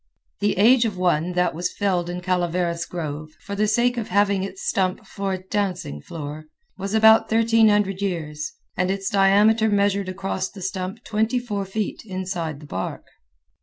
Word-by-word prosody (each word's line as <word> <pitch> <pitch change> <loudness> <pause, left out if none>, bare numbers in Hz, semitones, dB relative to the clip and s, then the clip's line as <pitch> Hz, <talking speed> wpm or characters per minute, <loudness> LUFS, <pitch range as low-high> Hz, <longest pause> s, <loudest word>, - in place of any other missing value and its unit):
The 205 -2 +1
age 235 +5 +6
of 210 -4 -2
one 175 -1 +1
that 180 0 +1
was 175 +3 -2
felled 180 -4 0
in 180 0 -4
Calaveras 175 -1 -1
grove, 155 -3 -5
for 200 - -8
the 210 +1 +1
sake 240 +3 +2
of 230 - -2
having 200 0 +2
its 195 0 -6
stump 185 -1 0
for 195 -1 -4
a - - -1
dancing 185 - -3
floor, 150 - -7 0.3
was 195 +2 -3
about 220 0 +6
1300 220 -4 +3
years, 155 -6 -3 0.2
and 180 - 0
its 195 0 -2
diameter 205 +3 +4
measured 200 -1 +1
across 190 0 -3
the 195 -3 -10
stump 190 +4 -4
twenty 220 +3 0
four 210 -5 -3
feet 205 +2 -3
inside 180 -7 -4
the - - -11
bark. 95 -9 -5
195 Hz, 165 wpm, -23 LUFS, 180-205 Hz, 0.3 s, age